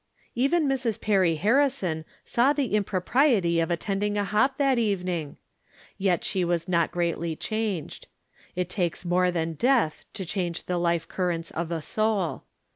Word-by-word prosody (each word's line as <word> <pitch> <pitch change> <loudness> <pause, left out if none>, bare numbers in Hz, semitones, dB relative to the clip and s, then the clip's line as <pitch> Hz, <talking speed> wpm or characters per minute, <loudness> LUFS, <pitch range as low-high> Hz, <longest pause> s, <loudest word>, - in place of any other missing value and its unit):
Even 280 +6 +2
Mrs. 255 -5 -1
Perry 190 -6 +2
Harrison 205 - +1 0.2
saw 255 +5 +3
the 275 -7 -1
impropriety 200 - +2
of 165 - 0
attending 200 +4 -1
a 205 - +1
hop 215 +7 +1
that 275 -3 +2
evening! 180 -8 -1 0.6
Yet 190 -3 +1
she 185 - 0
was 170 0 0
not 170 -3 +1
greatly 170 -1 -1
changed. 215 -4 -3 0.5
It 180 -1 -1
takes 180 -2 -2
more 180 +1 +2
than 165 -2 -1
death 235 - +1
to 190 - -4
change 175 -1 -3
the 180 -1 -2
life 170 -1 0
currents 175 -3 -2
of 165 0 -3
a 165 -2 -3
soul. 205 -10 -1
185 Hz, 150 wpm, -26 LUFS, 170-220 Hz, 0.6 s, saw